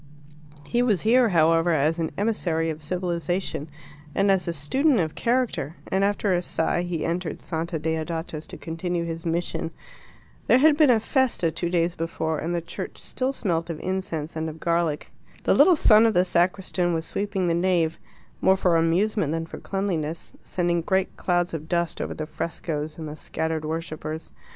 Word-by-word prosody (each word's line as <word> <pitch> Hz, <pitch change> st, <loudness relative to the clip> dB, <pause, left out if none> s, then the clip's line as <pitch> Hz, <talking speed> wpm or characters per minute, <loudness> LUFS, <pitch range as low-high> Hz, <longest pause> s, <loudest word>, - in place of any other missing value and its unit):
He 240 Hz, -, +1 dB
was 215 Hz, -8 st, +2 dB
here, 240 Hz, +2 st, +4 dB
however, 165 Hz, -1 st, +4 dB
as 155 Hz, +3 st, +2 dB
an 160 Hz, -, 0 dB
emissary 170 Hz, -7 st, 0 dB
of 155 Hz, 0 st, -7 dB
civilization 175 Hz, -1 st, -2 dB, 0.5 s
and 195 Hz, 0 st, +3 dB
as 190 Hz, -2 st, +1 dB
a -, -, +1 dB
student 245 Hz, -, +2 dB
of 160 Hz, -3 st, 0 dB
character, 235 Hz, -, 0 dB, 0.2 s
and, 190 Hz, +1 st, +2 dB
after 200 Hz, -1 st, +1 dB
a 175 Hz, -, +2 dB
sigh, 175 Hz, 0 st, 0 dB
he 175 Hz, -3 st, -2 dB
entered 170 Hz, -1 st, -2 dB
Santa 165 Hz, +1 st, -3 dB
Deodata's 160 Hz, 0 st, -3 dB
to -, -, -9 dB
continue 170 Hz, +1 st, -3 dB
his 165 Hz, +1 st, -5 dB
mission. 165 Hz, 0 st, -1 dB, 0.8 s
There -, -, +6 dB
had 300 Hz, +3 st, +6 dB
been 300 Hz, -2 st, +5 dB
a 235 Hz, -3 st, +5 dB
FESTA 235 Hz, -, +1 dB
two 170 Hz, +2 st, -2 dB
days 170 Hz, -1 st, +1 dB
before, 160 Hz, -2 st, -2 dB
and 170 Hz, +2 st, -2 dB
the 170 Hz, -, -1 dB
church 165 Hz, -, -7 dB
still 260 Hz, +1 st, -2 dB
smelt 170 Hz, -10 st, -1 dB
of 165 Hz, -, -4 dB
incense 175 Hz, -5 st, -3 dB
and 160 Hz, 0 st, -2 dB
of 160 Hz, +1 st, -9 dB
garlic. 170 Hz, -3 st, 0 dB, 0.3 s
The -, -, +3 dB
little 365 Hz, -, +7 dB
son 225 Hz, -6 st, +6 dB
of 225 Hz, -, 0 dB
the 180 Hz, +1 st, +4 dB
sacristan 180 Hz, 0 st, +1 dB
was 160 Hz, 0 st, -2 dB
sweeping 200 Hz, -2 st, -2 dB
the 170 Hz, -, +2 dB
nave, 170 Hz, -2 st, +1 dB, 0.4 s
more 190 Hz, 0 st, +5 dB
for 180 Hz, -3 st, +3 dB
amusement 170 Hz, +1 st, +2 dB
than 165 Hz, 0 st, -2 dB
for -, -, -9 dB
cleanliness, 170 Hz, -5 st, -3 dB
sending 175 Hz, -1 st, 0 dB
great 190 Hz, +2 st, 0 dB
clouds 175 Hz, -1 st, 0 dB
of 160 Hz, 0 st, -5 dB
dust 170 Hz, -1 st, 0 dB
over -, -, -3 dB
the 155 Hz, -, -4 dB
frescoes 155 Hz, -1 st, -4 dB
and 160 Hz, -2 st, -6 dB
the 150 Hz, -, -6 dB
scattered 160 Hz, 0 st, -3 dB
worshippers. 160 Hz, 0 st, -5 dB
170 Hz, 180 wpm, -25 LUFS, 160-190 Hz, 0.8 s, little